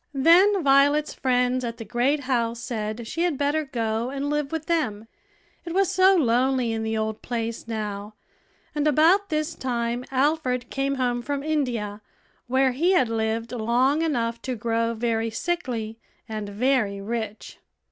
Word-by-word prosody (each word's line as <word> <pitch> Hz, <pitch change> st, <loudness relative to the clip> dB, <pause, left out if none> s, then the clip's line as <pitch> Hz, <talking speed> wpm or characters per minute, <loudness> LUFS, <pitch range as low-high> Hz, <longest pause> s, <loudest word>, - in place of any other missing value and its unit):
Then 355 Hz, +7 st, +5 dB
Violet's 285 Hz, +2 st, +4 dB
friends 250 Hz, 0 st, +1 dB
at 230 Hz, -1 st, -4 dB
the 225 Hz, -, -7 dB
great 260 Hz, +7 st, +1 dB
house 235 Hz, -3 st, -1 dB
said 225 Hz, -1 st, -4 dB
she 330 Hz, +9 st, -4 dB
had 345 Hz, -5 st, +1 dB
better 290 Hz, +2 st, 0 dB
go 230 Hz, -3 st, -2 dB
and 280 Hz, +2 st, -3 dB
live 295 Hz, -2 st, -1 dB
with 320 Hz, -1 st, -3 dB
them, 225 Hz, -11 st, -1 dB, 0.6 s
it 340 Hz, 0 st, -6 dB
was 385 Hz, -1 st, +3 dB
so 380 Hz, 0 st, +5 dB
lonely 255 Hz, -4 st, +2 dB
in 225 Hz, 0 st, -2 dB
the 220 Hz, 0 st, -2 dB
old 220 Hz, 0 st, -2 dB
place 230 Hz, -1 st, -4 dB
now; 210 Hz, -2 st, -5 dB, 0.6 s
and 300 Hz, 0 st, 0 dB
about 335 Hz, +7 st, +4 dB
this 310 Hz, +1 st, -1 dB
time 240 Hz, -3 st, -2 dB
Alfred 260 Hz, -3 st, 0 dB
came 275 Hz, 0 st, -1 dB
home 245 Hz, -2 st, 0 dB
from 280 Hz, +2 st, -3 dB
India, 240 Hz, -9 st, -2 dB, 0.5 s
where 260 Hz, +1 st, +3 dB
he 335 Hz, +9 st, +2 dB
had 260 Hz, -10 st, +3 dB
lived 225 Hz, +1 st, -1 dB
long 250 Hz, +5 st, +1 dB
enough 235 Hz, -7 st, -1 dB
to 255 Hz, -1 st, -3 dB
grow 230 Hz, 0 st, -1 dB
very 225 Hz, 0 st, 0 dB
sickly 230 Hz, -6 st, -3 dB, 0.3 s
and 215 Hz, -2 st, -5 dB
very 215 Hz, -2 st, +1 dB
rich. 220 Hz, +1 st, -5 dB
250 Hz, 155 wpm, -25 LUFS, 225-290 Hz, 0.6 s, Then